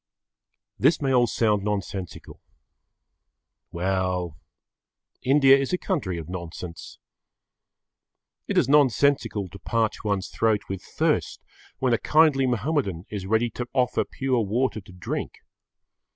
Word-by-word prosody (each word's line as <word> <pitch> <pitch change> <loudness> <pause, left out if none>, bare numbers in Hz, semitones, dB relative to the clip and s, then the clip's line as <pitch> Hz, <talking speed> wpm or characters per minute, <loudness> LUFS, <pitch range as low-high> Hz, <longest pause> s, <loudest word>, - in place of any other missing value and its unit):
This 150 +5 +4
may 135 -2 0
all 120 -1 +4
sound 105 -3 +1
nonsensical. 100 -3 -5 1.3
Well, 90 -2 -1 0.9
India 135 0 +6
is 135 +4 -1
a - - +3
country 140 - -2
of 80 -2 -7
nonsense. 85 -1 -8 1.5
It - - -1
is - - +4
nonsensical 140 -6 +3
to 100 - -12
parch 115 -2 -1
one's 100 -3 -1
throat 110 -2 +1
with 95 -1 -5
thirst - - -1 0.3
when 130 -2 +1
a 115 - +2
kindly 150 -4 +4
Mahomedan 120 - -1
is 100 -3 -5
ready 110 +3 +1
to 120 - -5
offer 125 -2 +1
pure 130 -3 -1
water 110 +2 -1
to 95 0 -16
drink. 90 -1 -5
110 Hz, 125 wpm, -25 LUFS, 95-135 Hz, 1.5 s, India